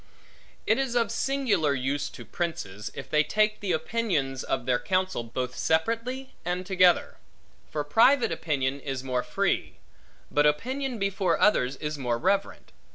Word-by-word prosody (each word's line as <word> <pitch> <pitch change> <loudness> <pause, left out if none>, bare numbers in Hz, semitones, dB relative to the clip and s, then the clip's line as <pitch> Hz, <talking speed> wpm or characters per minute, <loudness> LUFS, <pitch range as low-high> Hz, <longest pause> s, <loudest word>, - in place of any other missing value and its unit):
It - - +3
is 265 -3 -1
of 235 -1 +2
singular 215 - +1
use 140 +3 -1
to - - -11
princes, 105 - -4
if - - -7
they 150 -1 +3
take 215 +4 +1
the 200 -3 -2
opinions 160 - -1
of 130 -2 -2
their 125 -1 +2
counsel, 185 0 0
both 125 +2 -4
separately 230 +11 -1
and 180 +1 -2
together. 185 -2 +3 0.5
For 150 - -2
private 235 - +4
opinion 140 -4 -1
is 135 -2 -4
more 130 -2 0
free; 175 +11 -1 0.6
but 145 0 +4
opinion 255 - -1
before 195 -4 0
others, 135 -10 +3
is 150 +1 -4
more 120 -3 0
reverent. 195 +8 -1
165 Hz, 150 wpm, -27 LUFS, 135-215 Hz, 0.6 s, private